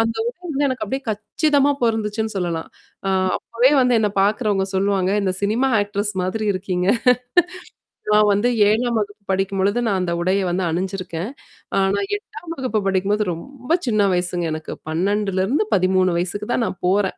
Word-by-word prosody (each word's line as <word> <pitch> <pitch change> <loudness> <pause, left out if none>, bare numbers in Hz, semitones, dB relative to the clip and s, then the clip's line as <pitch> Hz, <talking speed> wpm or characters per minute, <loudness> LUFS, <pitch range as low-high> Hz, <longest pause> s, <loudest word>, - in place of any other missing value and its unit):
அந்த 225 0 +1
உட 240 - -5
வந்து 290 -3 -1
எனக்கு 260 -1 -2
அப்டியியே 265 +1 -3
கச்சிதமா 280 +7 +1
பொருந்துச்சுன்னு 220 -1 0
சொல்லலாம். 170 -3 -2 0.4
அ - - +2 0.3
அப்பவே 245 +4 +2
வந்து 250 -1 +3
என்ன 210 -2 +1
பாக்கறவங்க 205 -1 +1
சொல்லுவாங்க, 190 -1 +1
இந்த 190 -1 0
"சினிமா 230 +6 +2
ஆக்டர்ஸ் 205 +1 -2
மாதிரி 210 +4 -2
இருக்கீங்க." 185 -1 -2 1.3
நான் 210 0 +5
வந்து 205 +4 +2 0.2
7ம் 235 +2 +1
வகுப்பு 205 0 -5
படிக்கும்பொழுது 195 +3 0
நான் 195 -3 +1
அந்த 175 -1 -1
உடைய 185 +3 +2
வந்து 185 +1 -1
அணிஞ்சிருக்கேன். 185 +1 -3 0.5
ஆனா 195 +1 +1 0.2
8ம் 350 -5 -9
வகுப்பு 255 -6 -1
படிக்கும்போது 195 +2 +1
ரொம்ப 270 - -2
சின்ன 215 -3 +3
வயசுங்க 180 -1 -1
எனக்கு 155 0 -6 0.2
12-13 190 - +1
வயசுக்கு 205 +4 -3
தான் 235 - +1
நான் 185 - -6
போறேன். 195 0 +1
205 Hz, 145 wpm, -21 LUFS, 185-225 Hz, 1.3 s, நான்